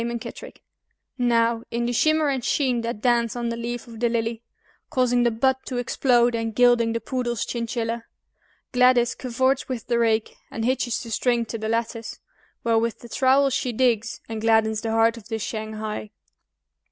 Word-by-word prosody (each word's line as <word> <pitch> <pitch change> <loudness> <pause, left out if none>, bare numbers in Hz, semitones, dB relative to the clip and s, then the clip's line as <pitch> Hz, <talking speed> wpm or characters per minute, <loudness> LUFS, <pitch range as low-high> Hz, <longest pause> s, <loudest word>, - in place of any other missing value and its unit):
MUNKITTRICK 235 -1 -6 0.6
Now, 230 -1 +2
in 235 0 -1
the 240 - -1
shimmer 310 +4 +3
and 265 -3 -1
sheen 255 -4 +1
that 230 -2 -4
dance 235 -2 +2
on 240 -1 -2
the 235 - -2
leaf 235 +1 -4
of 230 -2 -11
the 240 0 +2
lily, 230 0 -1 0.5
Causing 245 -1 +2
the 240 - +4
bud 260 +4 +1
to 255 - -3
explode, 245 -1 +2
and 225 -1 -2
gilding 240 -1 +4
the 230 - -1
poodle's 240 -1 -2
chinchilla, 230 -1 -3 0.7
Gladys 250 -1 +4
cavorts 260 +2 0
with 250 -4 -4
the 235 -1 +1
rake, 225 -1 +1 0.2
and 225 - -3
hitches 255 -1 0
the 230 - -8
string 240 0 +1
to 230 +1 -5
the 220 0 -3
lattice, 230 0 -3 0.4
While 230 -1 +3
with 230 0 -2
the 235 - -11
trowel 270 +3 +3
she 255 -1 -1
digs, 235 -1 0
and 225 -1 -5
gladdens 220 -1 +2
the 225 - -3
heart 225 +1 +3
of 220 -2 -12
the 225 -1 -2
shanghai. 215 -1 -5
235 Hz, 175 wpm, -24 LUFS, 225-245 Hz, 0.7 s, the